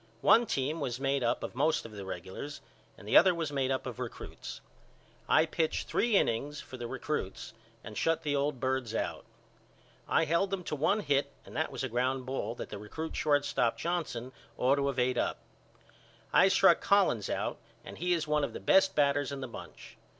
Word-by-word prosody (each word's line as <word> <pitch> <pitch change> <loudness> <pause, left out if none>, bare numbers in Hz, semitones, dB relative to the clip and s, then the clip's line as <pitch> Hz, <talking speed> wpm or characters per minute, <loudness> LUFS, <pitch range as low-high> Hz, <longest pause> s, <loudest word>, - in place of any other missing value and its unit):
One 235 +1 +5
team 145 +2 -1
was 125 -4 -3
made 135 -1 0
up 115 - 0
of - - -5
most 150 +4 +1
of 115 - -9
the 100 -2 -8
regulars 95 - -6 0.4
and - - -13
the - - +1
other 180 0 +7
was 165 -3 -2
made 135 -2 0
up 130 -1 -1
of 125 -1 -6
recruts. 125 -2 -7 0.7
I 155 - +5
pitched 160 0 -1
three 235 -2 +1
innings 145 +5 0
for - - -9
the 120 -2 -5
recruts 130 -6 -4 0.3
and 110 - -9
shut 165 +7 +1
the 145 -1 0
old 140 -1 0
birds 130 -3 -1
out. - - -3 0.8
I 165 - +3
held 170 +5 +1
them 195 -1 -3
to 155 - -3
one 195 +9 +2
hit 140 -5 +1
and - - -12
that 160 - -1
was - - -4
a - - 0
ground 130 +2 -1
ball 125 -3 -3
that - - -7
the 105 - -6
recrut 155 +10 -6
shortstop 145 -5 +1
Johnson 160 -8 -3 0.3
ought 135 +3 +3
to 140 0 +1
of 135 - -4
ate 125 0 +2
up. - - 0 1.0
I - - +7
struck - - +5
Collins - - +3
out - - -2 0.3
and - - -9
he 180 +2 +1
is 160 -3 -1
one 150 -1 +2
of - - -2
the - - -5
best 190 0 +4
batters 145 -1 +2
in 140 - -4
the 130 - -5
bunch. 120 - -11
140 Hz, 200 wpm, -31 LUFS, 125-155 Hz, 1.0 s, other